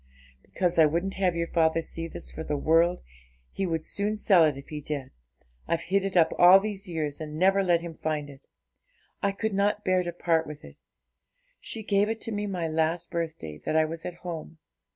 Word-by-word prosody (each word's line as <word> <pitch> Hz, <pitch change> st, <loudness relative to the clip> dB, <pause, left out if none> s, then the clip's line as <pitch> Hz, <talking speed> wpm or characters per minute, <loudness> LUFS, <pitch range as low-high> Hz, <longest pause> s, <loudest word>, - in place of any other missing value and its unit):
'Because 175 Hz, -, -1 dB
I 160 Hz, -, +7 dB
wouldn't 175 Hz, +5 st, -1 dB
have 185 Hz, -3 st, 0 dB
your 170 Hz, 0 st, 0 dB
father 165 Hz, -1 st, +2 dB
see 165 Hz, 0 st, -4 dB
this -, -, -8 dB
for 160 Hz, -, -6 dB
the 150 Hz, -, -2 dB
world; 165 Hz, +4 st, +2 dB, 0.5 s
he 195 Hz, -, -2 dB
would 165 Hz, -2 st, -2 dB
soon 205 Hz, +5 st, -1 dB
sell 190 Hz, -5 st, +5 dB
it 150 Hz, -3 st, +2 dB
if 140 Hz, -, -11 dB
he 150 Hz, -1 st, -5 dB
did. 140 Hz, -3 st, -4 dB, 0.6 s
I've 170 Hz, -, 0 dB
hid 195 Hz, +2 st, +1 dB
it 195 Hz, -2 st, -1 dB
up 165 Hz, -2 st, +4 dB
all 180 Hz, +2 st, +9 dB
these 200 Hz, -1 st, -5 dB
years, 155 Hz, -3 st, -3 dB
and 155 Hz, 0 st, -6 dB
never 195 Hz, +3 st, +4 dB
let 175 Hz, -2 st, +3 dB
him 170 Hz, -1 st, -7 dB
find 155 Hz, -2 st, -3 dB
it. 140 Hz, -2 st, -14 dB, 0.7 s
I 200 Hz, -, +1 dB
could 215 Hz, +2 st, -3 dB
not 205 Hz, +1 st, +1 dB
bear 185 Hz, 0 st, +3 dB
to 175 Hz, -1 st, -3 dB
part 165 Hz, -1 st, 0 dB
with 150 Hz, 0 st, -9 dB
it; -, -, -14 dB, 0.8 s
she 225 Hz, -, -5 dB
gave 205 Hz, 0 st, +2 dB
it 225 Hz, 0 st, -2 dB
to 225 Hz, -, -3 dB
me 205 Hz, -1 st, -2 dB
my 180 Hz, -4 st, -2 dB
last 160 Hz, +2 st, -1 dB
birthday 155 Hz, -, -4 dB
that -, -, -2 dB
I 160 Hz, 0 st, +4 dB
was 165 Hz, +1 st, -6 dB
at 180 Hz, -, -5 dB
home. 165 Hz, -1 st, -6 dB
170 Hz, 215 wpm, -27 LUFS, 160-195 Hz, 0.8 s, all